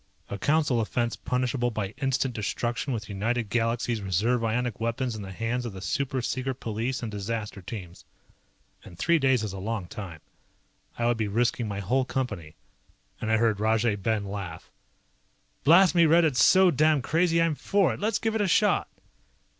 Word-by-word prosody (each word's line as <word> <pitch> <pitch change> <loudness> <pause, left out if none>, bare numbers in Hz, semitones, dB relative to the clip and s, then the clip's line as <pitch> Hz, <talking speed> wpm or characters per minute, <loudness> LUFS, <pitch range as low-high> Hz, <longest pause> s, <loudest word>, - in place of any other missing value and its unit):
A 100 - -4
Council 145 -4 +2
offense 120 +1 -1
punishable 125 -1 -1
by 105 -4 -3
instant 135 -1 0
destruction 120 +5 -2
with 110 -4 -3
United 110 +3 -2
Galaxies 115 0 0
reserve 105 +6 0
ionic 120 0 -1
weapons 115 +2 -1
in 110 - -6
the 95 -1 -7
hands 115 +5 -2
of 120 -4 -5
the 95 - -8
super 130 +6 -2
secret 130 +1 -2
police 115 +3 -3
and 110 - -4
disaster 105 0 -4
teams. 90 -3 -8 0.8
And 85 - -13
three 170 - +2
days 130 -4 +2
is 105 -3 -4
a 95 - -6
long 105 -1 -3
time. 85 -4 -8 0.8
I 120 - -1
would 120 -1 +2
be 110 -2 -1
risking 115 +2 0
my 100 -1 -4
whole 130 +8 +1
Company. 105 -13 -4 0.7
I 110 0 +2
heard 110 -2 +1
Rajay 110 0 +2
Ben 105 +1 -1
laugh. 95 -5 -7 0.9
"Blast 170 +2 +6
me, 170 -2 +5
Red, 165 +2 +5
it's 140 -6 +3
so 190 -1 +6
damned 155 -1 +3
crazy 165 +3 +2
I'm 165 -1 +2
for 185 - +1
it. - - -8
Let's 220 +2 0
give 225 -1 -1
it 220 - 0
a 205 - +2
shot." 175 - +2
115 Hz, 180 wpm, -27 LUFS, 105-135 Hz, 0.9 s, Blast